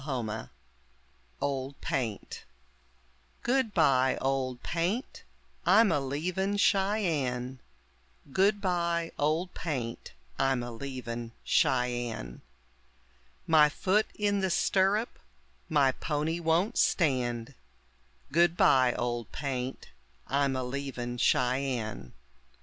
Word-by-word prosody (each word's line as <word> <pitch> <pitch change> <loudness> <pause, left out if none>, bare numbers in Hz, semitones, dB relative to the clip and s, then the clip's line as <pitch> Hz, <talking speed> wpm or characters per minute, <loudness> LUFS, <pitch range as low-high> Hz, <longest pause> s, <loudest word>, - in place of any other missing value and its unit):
] 135 - -11
OLD 130 -2 0
PAINT 110 -1 -4 1.3
REFRAIN: 115 -6 -2 1.2
Goodbye, 165 - +3
Old 130 -2 -1
Paint, 180 +9 -2 0.4
I'm 210 +1 +5
a 145 - +2
leavin' 180 +9 -1
Cheyenne, 160 - +1 0.7
Goodbye, 175 -3 +1
Old 160 +5 0
Paint, 130 -8 -4 0.3
I'm 135 -2 +2
a 120 - -6
leavin' 120 -2 -6
Cheyenne, 120 - 0 1.0
My 155 -2 +6
foot 195 +7 +1
in 205 -1 +1
the 190 -1 0
stirrup, 195 +5 +1 0.5
my 145 -4 +4
pony 155 +4 -2
won't 170 +7 +1
stand; 125 -8 +1 0.8
Goodbye, 145 -6 +4
Old 120 -2 -3
Paint, 130 -2 -4 0.4
I'm 140 -1 +1
a 130 - -1
leavin' 125 -2 -4
Cheyenne. 125 - 0
140 Hz, 90 wpm, -29 LUFS, 125-175 Hz, 1.3 s, My